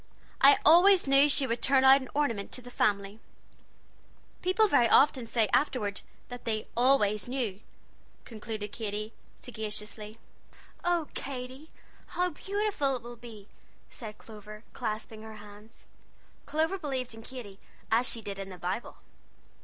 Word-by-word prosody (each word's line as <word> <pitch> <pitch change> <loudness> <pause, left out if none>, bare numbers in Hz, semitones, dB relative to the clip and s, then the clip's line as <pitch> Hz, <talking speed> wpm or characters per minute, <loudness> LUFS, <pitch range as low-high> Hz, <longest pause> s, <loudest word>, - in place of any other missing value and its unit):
I 280 +1 +8
always 355 +4 +7
knew 275 +1 +5
she 285 -1 +5
would 235 -1 -2
turn 270 -1 +4
out 265 +1 +7
an 260 - -9
ornament 235 -9 -1
to 255 - -6
the 245 - -11
family,' 200 -1 0 1.2
People 375 +4 +3
very 240 - +4
often 265 -4 +4
say, 225 -1 +1
afterward, 245 -8 0 0.3
that 245 0 -8
they 220 -2 -2
'always 235 -5 +3
knew,'" 240 -7 -3 0.7
concluded 215 -2 -6
Katy 215 0 -5 0.2
sagaciously. 215 -1 -7 0.7
"Oh, 345 -3 0
Katy! 260 +3 -7 0.5
how 360 0 +1
beautiful 390 -6 -1
it 245 - -7
will 240 0 -9
be!" 225 -4 -12 0.4
said 215 -3 -8
Clover, 210 0 -12
clasping 215 0 -5
her 220 0 -10
hands. 210 +1 -11 0.6
Clover 320 +5 0
believed 260 -6 -4
in 225 - -11
Katy 225 -6 -10 0.3
as 235 +3 +3
she 230 - -1
did 200 -1 -6
in 195 0 -6
the 185 - -9
Bible. 180 +6 -4
235 Hz, 140 wpm, -29 LUFS, 215-275 Hz, 1.2 s, I